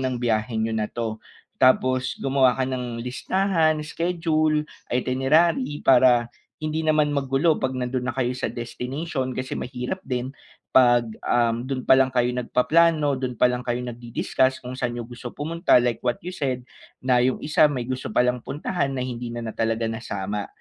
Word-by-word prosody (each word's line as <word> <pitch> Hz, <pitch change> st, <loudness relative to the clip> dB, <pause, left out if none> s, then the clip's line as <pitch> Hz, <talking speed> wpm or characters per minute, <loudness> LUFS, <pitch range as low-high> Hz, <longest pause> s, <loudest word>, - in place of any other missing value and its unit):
ng 130 Hz, -1 st, -1 dB
biyahe 110 Hz, -1 st, 0 dB
niyo 110 Hz, 0 st, -1 dB
na 110 Hz, -, 0 dB
'to. 115 Hz, -2 st, -3 dB, 0.4 s
Tapos 130 Hz, 0 st, +3 dB
gumawa 135 Hz, -2 st, +3 dB
ka 130 Hz, -, 0 dB
ng 125 Hz, -2 st, -4 dB
listahan, 160 Hz, +4 st, +1 dB
schedule, 155 Hz, -1 st, 0 dB, 0.3 s
itinerary 135 Hz, +3 st, +2 dB
para 125 Hz, -2 st, +5 dB, 0.3 s
hindi 155 Hz, +1 st, -2 dB
naman 155 Hz, -1 st, +3 dB
magulo 140 Hz, +4 st, +2 dB
'pag 130 Hz, 0 st, -1 dB
nandun 125 Hz, 0 st, -2 dB
na 130 Hz, -, -1 dB
kayo 125 Hz, -1 st, -1 dB
sa -, -, -3 dB
destination 130 Hz, +3 st, -4 dB
kasi 130 Hz, +1 st, -4 dB
mahirap 125 Hz, +8 st, -4 dB
din 125 Hz, -1 st, -2 dB, 0.4 s
pag, 120 Hz, -2 st, +5 dB, 0.2 s
um, 120 Hz, 0 st, +1 dB
dun 130 Hz, -1 st, -3 dB
pa 130 Hz, -, +5 dB
lang 130 Hz, -1 st, +2 dB
kayo 125 Hz, 0 st, +2 dB
nagpaplano 150 Hz, +4 st, +2 dB
dun 130 Hz, -2 st, -3 dB
pa 125 Hz, +2 st, +3 dB
lang 125 Hz, 0 st, -3 dB
kayo 120 Hz, 0 st, -1 dB
nag-di-discuss 120 Hz, +2 st, -1 dB
kung 125 Hz, +1 st, -7 dB
saan 125 Hz, -2 st, -1 dB
'yung 120 Hz, -1 st, -6 dB
gusto 120 Hz, 0 st, -8 dB
pumunta, 165 Hz, -2 st, +2 dB
like 120 Hz, -2 st, 0 dB
what 120 Hz, -1 st, 0 dB
you 175 Hz, -, -6 dB
said, 135 Hz, -8 st, -2 dB, 0.4 s
na 130 Hz, -1 st, +3 dB
'yung 125 Hz, +1 st, +1 dB
isa 155 Hz, +1 st, +3 dB
may 140 Hz, -5 st, -2 dB
gusto 130 Hz, -4 st, -4 dB
palang 125 Hz, 0 st, +2 dB
puntahan 145 Hz, -1 st, -2 dB
na 130 Hz, -, -2 dB
hindi 120 Hz, -1 st, -5 dB
na 120 Hz, -, -4 dB
na 115 Hz, -, -4 dB
talaga 115 Hz, 0 st, 0 dB
nasama. 105 Hz, -3 st, -4 dB
130 Hz, 170 wpm, -24 LUFS, 120-145 Hz, 0.4 s, para